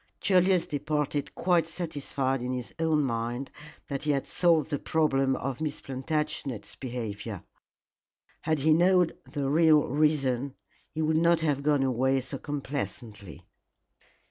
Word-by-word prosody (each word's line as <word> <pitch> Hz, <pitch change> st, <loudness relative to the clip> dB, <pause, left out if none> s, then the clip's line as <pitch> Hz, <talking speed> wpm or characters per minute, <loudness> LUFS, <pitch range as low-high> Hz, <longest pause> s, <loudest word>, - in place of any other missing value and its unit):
Julius 185 Hz, 0 st, +3 dB
departed 150 Hz, -2 st, -2 dB
quite 170 Hz, -2 st, +2 dB
satisfied 145 Hz, -6 st, -2 dB
in 125 Hz, +1 st, -2 dB
his 125 Hz, -1 st, -5 dB
own 160 Hz, -2 st, +2 dB
mind 120 Hz, +1 st, -3 dB, 0.4 s
that 140 Hz, -2 st, -3 dB
he 150 Hz, -, -3 dB
had 140 Hz, -2 st, +1 dB
solved 165 Hz, -3 st, +2 dB
the 145 Hz, -, -1 dB
problem 135 Hz, -4 st, +1 dB
of 135 Hz, +2 st, -4 dB
Miss 155 Hz, -2 st, -2 dB
Plantagenet's 135 Hz, -5 st, -4 dB
behavior. 110 Hz, -5 st, -5 dB, 1.0 s
Had 160 Hz, 0 st, 0 dB
he 155 Hz, +3 st, +3 dB
known 180 Hz, +1 st, +4 dB, 0.2 s
the 140 Hz, -2 st, -2 dB
real 155 Hz, +1 st, +5 dB
reason 140 Hz, -2 st, +1 dB, 0.3 s
he 160 Hz, -, -3 dB
would 155 Hz, 0 st, +2 dB
not 170 Hz, 0 st, +3 dB
have 145 Hz, -3 st, 0 dB
gone 145 Hz, -1 st, +2 dB
away 130 Hz, +1 st, +2 dB
so 130 Hz, +2 st, -6 dB
complacently. 125 Hz, -, -6 dB
145 Hz, 135 wpm, -28 LUFS, 130-160 Hz, 1.0 s, real